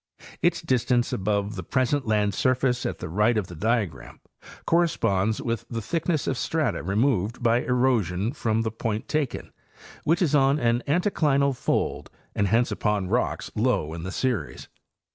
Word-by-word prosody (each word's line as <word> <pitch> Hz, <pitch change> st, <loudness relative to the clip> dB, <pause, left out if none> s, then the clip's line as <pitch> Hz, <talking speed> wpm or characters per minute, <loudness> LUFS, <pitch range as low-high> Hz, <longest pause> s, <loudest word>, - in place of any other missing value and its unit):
Its -, -, +2 dB
distance 125 Hz, -1 st, +1 dB
above 100 Hz, +1 st, -1 dB
the 95 Hz, -, -4 dB
present 130 Hz, -, 0 dB
land 105 Hz, -2 st, +2 dB
surface 125 Hz, +2 st, +1 dB
at -, -, -4 dB
the -, -, -6 dB
right 105 Hz, +7 st, +2 dB
of 105 Hz, -, 0 dB
the 90 Hz, -, -10 dB
diagram 110 Hz, +1 st, -2 dB, 0.5 s
corresponds 110 Hz, -, +1 dB
with 115 Hz, -3 st, -2 dB
the 115 Hz, -, -3 dB
thick 160 Hz, +10 st, -3 dB
ness 155 Hz, -4 st, +1 dB
of 130 Hz, -, -1 dB
strata 160 Hz, -1 st, -1 dB
removed 110 Hz, -, 0 dB
by 120 Hz, 0 st, +3 dB
erosion 120 Hz, -5 st, +1 dB
from 115 Hz, -5 st, 0 dB
the 110 Hz, -, -2 dB
point 110 Hz, -1 st, -3 dB
taken, 150 Hz, -4 st, -2 dB, 0.5 s
which 165 Hz, +4 st, +2 dB
is 155 Hz, -, 0 dB
on 135 Hz, 0 st, +4 dB
an 120 Hz, -2 st, +2 dB
anticlinal 145 Hz, -5 st, +2 dB
fold -, -, -1 dB, 0.2 s
and 100 Hz, -, +1 dB
hence 115 Hz, +5 st, +2 dB
upon 105 Hz, -3 st, -1 dB
rocks 120 Hz, +4 st, -1 dB
low 110 Hz, -9 st, 0 dB
in 85 Hz, -, -6 dB
the 95 Hz, +3 st, -5 dB
series. 115 Hz, -, -2 dB
115 Hz, 160 wpm, -25 LUFS, 105-130 Hz, 0.5 s, on